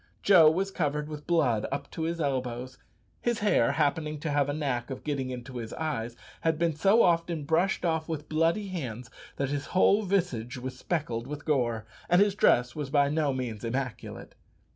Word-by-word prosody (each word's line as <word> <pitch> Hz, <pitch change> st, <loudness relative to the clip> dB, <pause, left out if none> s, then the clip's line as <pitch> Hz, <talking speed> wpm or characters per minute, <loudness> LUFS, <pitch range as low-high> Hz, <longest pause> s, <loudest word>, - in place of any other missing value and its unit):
Joe 175 Hz, -6 st, +7 dB
was 190 Hz, +5 st, -1 dB
covered 150 Hz, -4 st, -1 dB
with 150 Hz, -1 st, -8 dB
blood 135 Hz, -11 st, +2 dB
up 140 Hz, -, -4 dB
to 165 Hz, 0 st, -2 dB
the 170 Hz, -1 st, -3 dB
elbows. 125 Hz, -2 st, -3 dB, 0.4 s
His 240 Hz, -2 st, 0 dB
hair, 205 Hz, -, +2 dB
happening 150 Hz, 0 st, 0 dB
to 155 Hz, -, -2 dB
have 145 Hz, -1 st, +2 dB
a -, -, 0 dB
knack 135 Hz, -5 st, -2 dB
of 130 Hz, -, -6 dB
getting 140 Hz, -3 st, -2 dB
into 125 Hz, 0 st, -7 dB
his 115 Hz, -2 st, -6 dB
eyes, 120 Hz, -7 st, -3 dB, 0.3 s
had 160 Hz, -1 st, +1 dB
been 165 Hz, -1 st, +1 dB
so 195 Hz, +8 st, +4 dB
often 170 Hz, -2 st, +1 dB
brushed 170 Hz, +5 st, +1 dB
off 160 Hz, -1 st, 0 dB
with 155 Hz, -2 st, -4 dB
bloody 165 Hz, +6 st, +1 dB
hands, 125 Hz, -10 st, -5 dB, 0.2 s
that 140 Hz, -1 st, -2 dB
his 145 Hz, 0 st, -3 dB
whole 195 Hz, +2 st, +4 dB
visage 175 Hz, -, -1 dB
was 130 Hz, +1 st, -6 dB
speckled 125 Hz, -5 st, -3 dB
with 145 Hz, 0 st, -7 dB
gore, 120 Hz, -7 st, 0 dB, 0.2 s
and 175 Hz, +1 st, +5 dB
his 205 Hz, 0 st, +4 dB
dress 125 Hz, -, +3 dB
was 150 Hz, -3 st, -4 dB
by 140 Hz, 0 st, +3 dB
no 150 Hz, -1 st, +1 dB
means 125 Hz, -5 st, -4 dB
immaculate. 125 Hz, +1 st, -4 dB
150 Hz, 185 wpm, -28 LUFS, 130-165 Hz, 0.4 s, Joe